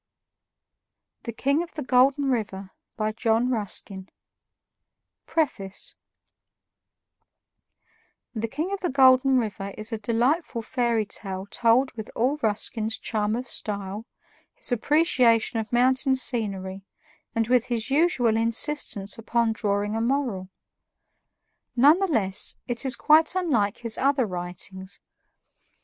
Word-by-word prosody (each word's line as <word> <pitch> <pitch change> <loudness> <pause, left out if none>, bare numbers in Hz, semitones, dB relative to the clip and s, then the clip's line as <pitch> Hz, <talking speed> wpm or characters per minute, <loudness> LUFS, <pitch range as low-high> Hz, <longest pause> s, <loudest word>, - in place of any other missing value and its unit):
The 235 - -3
King 280 +7 0
of 345 - -8
the 300 - -4
Golden 265 +3 +3
River 200 -5 -3 0.3
by 215 -1 0
John 230 +2 +1
Ruskin 195 -3 -3 1.2
PREFACE 205 - -2 2.4
"The 230 -1 -2
King 310 - -3
of 400 - -3
the 360 - -1
Golden 260 0 +5
River" 200 -4 -3
is 215 +2 -5
a 225 - -3
delightful 235 +4 0
fairy 235 -2 0
tale 190 -1 -5
told 235 +5 +2
with 220 -2 -8
all 260 +6 +1
Ruskin's 220 0 -1
charm 215 0 -1
of 250 +2 -4
style, 205 0 -5 0.5
his - - -2
appreciation 245 -4 +3
of 220 - -5
mountain 260 +2 +3
scenery, 195 -7 -1 0.5
and 225 -1 +1
with 245 -1 +3
his 240 0 -3
usual 270 -7 +2
insistence 225 -3 0
upon 230 0 0
drawing 205 -1 -1
a 225 - -1
moral. 235 -7 -1 1.3
None 290 +8 +6
the 390 - +1
less, 200 - -1
it 240 -1 -3
is 260 - +1
quite 315 +4 +4
unlike 245 - +1
his 230 -2 -3
other 275 -2 +2
writings. 185 +1 -6
230 Hz, 120 wpm, -25 LUFS, 210-265 Hz, 2.4 s, None